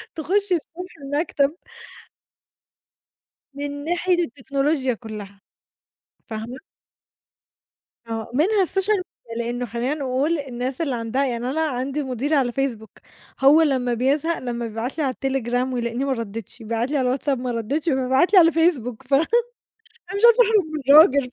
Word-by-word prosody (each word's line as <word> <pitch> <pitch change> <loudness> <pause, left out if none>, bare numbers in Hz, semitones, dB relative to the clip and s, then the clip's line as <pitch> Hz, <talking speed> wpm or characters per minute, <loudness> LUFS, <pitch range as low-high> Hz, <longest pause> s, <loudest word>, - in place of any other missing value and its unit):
تخشّي 370 +4 +1
الصبح 355 +3 -7
المكتب. 285 +1 0 2.0
من 285 0 -5
ناحية 350 +2 +1
التكنولوجيا 275 +1 -1
كلّها، 210 -3 -9 0.9
فاهمة؟ 225 +3 -6 1.5
آه، 225 0 -5
منها 380 - +3
الSocial 385 +4 +1
Media، 235 -10 -10
لإنه 240 +1 -2
خلّينا 240 +5 -2
نقول 285 +3 -1
الناس 260 +1 -4
اللي 275 -6 -1
عندها 235 +4 -1
يعني 245 -1 -2
أنا 310 +4 -1
عندي 275 -1 -2
مديري 265 +4 -1
على 255 -4 +2
Facebook، 235 -5 -4 0.4
هو 280 +4 +6
لمّا 260 -5 +1
بيزهق 285 +7 0
لمّا 240 -2 -4
بيبعت 225 +6 -5
لي 315 - 0
على 265 -2 0
الTelegram 255 -1 -1
ويلقيني 235 +1 -2
ما 275 - -1
ردّيتش، 230 -1 -7
بيبعت 230 +4 -2
لي 300 - +1
على 255 -1 +1
الWhatsApp 285 - -4
ما 250 0 -3
ردّيتش، 265 +8 -2
فبيبعت 265 +6 +2
لي 385 - +9
على 330 -1 +6
الFacebook، 265 -7 0
ف - - -3
أنا 280 +4 +5 0.9
مش 400 - -3
عارفة 475 +1 +7
أهرب 420 -3 +3
من 305 - -2
الراجل، 280 -5 +6
270 Hz, 145 wpm, -22 LUFS, 240-310 Hz, 2.0 s, لي